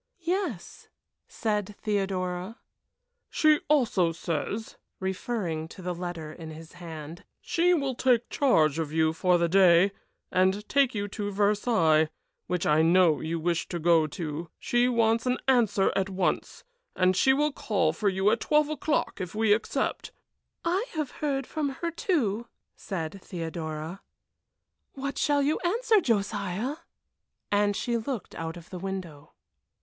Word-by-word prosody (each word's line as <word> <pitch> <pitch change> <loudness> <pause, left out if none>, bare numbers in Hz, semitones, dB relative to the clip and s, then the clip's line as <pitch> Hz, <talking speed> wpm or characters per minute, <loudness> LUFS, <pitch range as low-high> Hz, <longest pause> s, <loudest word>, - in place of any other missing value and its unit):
"Yes," 345 - -3 0.4
said 210 -2 -2
Theodora. 190 -1 -2 0.7
"She 310 -1 +4
also 230 - +3
says," 165 +7 -4 0.2
referring 190 -4 -3
to 185 - -12
the 180 0 -2
letter 170 -3 -6
in 160 -1 -9
his 160 +1 -10
hand, 165 -1 -9 0.2
"she 355 +1 +2
will 275 -4 -1
take 245 -1 +2
charge 160 - +2
of 155 -2 -2
you 160 0 +2
for 180 +2 +3
the 170 0 +2
day, 185 +1 +5 0.4
and 190 +3 +2
take 275 -3 +2
you 205 0 -1
to 205 +1 -4
Versailles, 200 -6 +3 0.4
which 180 -1 -1
I 150 +1 +4
know 170 -1 +4
you 165 +1 -3
wish 170 0 -1
to 175 - -4
go 165 -1 +4
to. 155 +1 -5
She 240 +1 +2
wants 230 0 +2
an 250 - +2
answer 225 -7 +3
at 195 0 0
once, 190 -1 -2 0.3
as 185 0 +3
she 265 - +4
will 295 +3 +2
call 215 -7 0
for 210 -2 +1
you 190 +2 +2
at 230 - +1
twelve 300 +3 +2
o'clock 305 -7 -1
if 180 +2 -5
we 220 -1 +4
accept." 220 - -2 0.5
"I 375 +8 +1
have 305 -5 -2
heard 275 -3 -2
from 300 0 -2
her, 335 +5 -4
too," 240 - 0 0.3
said 175 -1 -5
Theodora. 160 0 -5 0.9
"What 280 +1 -4
shall 290 -1 +2
you 300 +3 +1
answer, 440 +3 +2
Josiah?" 205 - -1 0.7
and 205 0 +2
she 235 +2 -1
looked 230 -3 -5
out 165 +1 -5
of 170 - -13
the 180 - -6
window. 180 -6 -6
195 Hz, 145 wpm, -27 LUFS, 170-250 Hz, 0.9 s, day